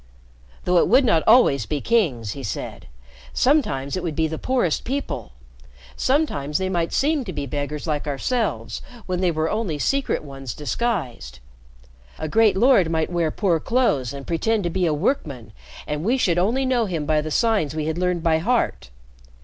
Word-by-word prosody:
"Though 180 -1 +4
it - - +3
would 260 +3 +5
not 165 -9 +3
always 220 - +5
be 150 - -1
kings," 140 - +1
he 140 - -7
said. 105 - -6 0.5
"Sometimes 145 - +1
it 185 - -2
would 165 -4 -3
be 160 +1 +1
the 160 0 -5
poorest 250 -11 0
people. 270 - -4 0.6
Sometimes 150 - 0
they 190 0 -1
might 170 -3 -1
seem 295 0 +1
to 200 - -6
be 145 -5 -4
beggars 145 +2 -4
like 150 -2 -2
ourselves, 145 - -2 0.2
when 180 -1 -2
they 185 - +3
were 160 -1 0
only 210 -6 -2
Secret 275 - 0
Ones 135 -4 -7
disguised. 150 - -3 0.8
A 155 - -4
great 220 +4 +3
lord 230 -7 +4
might 160 +1 -1
wear 170 -2 +1
poor 175 -1 +1
clothes 155 - +1
and 140 -1 -8
pretend 205 +6 0
to 175 - -1
be 180 0 +1
a - - +2
workman, 145 - -2 0.3
and 150 +1 -3
we 240 +7 +2
should 175 -8 +2
only 235 +9 +1
know 245 -4 +1
him 165 -5 -3
by 155 0 +2
the 155 - -5
signs 200 - +1
we 155 -1 -2
had 160 +2 -2
learned 180 -2 0
by 160 -1 +3
heart. 160 - 0
170 Hz, 180 wpm, -22 LUFS, 150-225 Hz, 0.8 s, would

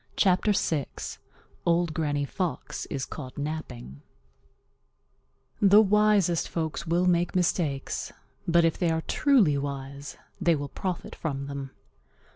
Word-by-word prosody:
CHAPTER 190 +2 +3
VI 155 -7 0 0.8
Old 170 -1 +2
Granny 145 -3 0
Fox 180 +4 -4
Is 135 -3 -3
Caught 130 -4 -8
Napping 75 - -5 1.6
The 205 +1 +7
wisest 205 -4 +3
folks 165 0 -3
will 175 +2 +2
make 175 0 +2
mistakes, 165 -6 -1 0.4
but 170 0 +4
if 165 - 0
they 175 - +2
are 160 0 0
truly 205 - +3
wise 140 0 -6 0.2
they 170 -1 +4
will 145 -1 -4
profit 185 +3 -4
from 140 -4 -4
them. 140 -1 -5
160 Hz, 120 wpm, -27 LUFS, 140-180 Hz, 1.6 s, The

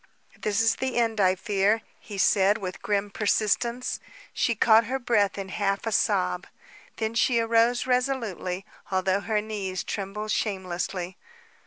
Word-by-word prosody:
"This 210 0 0
is 225 0 +3
the 260 -1 -2
end, 225 -2 +1
I 185 -1 +4
fear," 205 +2 +1 0.2
he 205 - -9
said, 195 +1 +4
with 185 -4 -6
grim 205 0 -1
persistence. 225 +4 0 0.3
She 235 - +1
caught 225 +1 +5
her 260 +4 -1
breath 225 -6 +1
in 195 -1 -5
half 195 +1 -1
a 225 - -1
sob. 90 - +1 0.5
Then 220 0 -2
she 235 +1 +2
arose 230 +1 +3
resolutely, 245 -8 -1 0.2
although 190 0 +1
her 210 0 0
knees 200 -4 -4
trembled 210 +2 -4
shamelessly. 185 -2 -2
210 Hz, 145 wpm, -26 LUFS, 195-230 Hz, 0.5 s, caught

